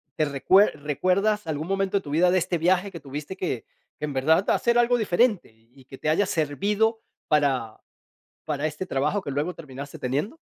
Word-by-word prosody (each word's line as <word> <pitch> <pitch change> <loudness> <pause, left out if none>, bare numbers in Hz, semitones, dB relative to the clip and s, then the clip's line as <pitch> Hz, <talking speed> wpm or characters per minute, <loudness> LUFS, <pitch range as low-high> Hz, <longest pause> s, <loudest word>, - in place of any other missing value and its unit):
te 155 - +1
recuer 155 +5 +3
recuerdas 185 +7 +1
algún 155 +1 -3
momento 195 0 0
de - - -1
tu 145 - -8
vida 175 +4 +4
de 185 - +3
este 175 -1 0
viaje 185 +3 +2
que 170 - -8
tuviste 145 +6 -7
que 165 - -3 0.3
que 150 - -3
en 145 - -5
verdad 160 +8 +2
hacer 235 0 +2
algo 240 0 +3
diferente,y 175 - 0
y 135 -2 -18
que 135 0 -11
te - - -5
haya 190 +5 +2
servido 205 +9 0 0.3
para 135 -7 +1 0.6
para 150 0 -2
este 155 +4 -4
trabajo 150 +9 0
que 140 - -5
luego 150 +6 -2
terminaste 140 -2 -9
teniendo? 145 - -2
160 Hz, 190 wpm, -25 LUFS, 145-195 Hz, 0.6 s, vida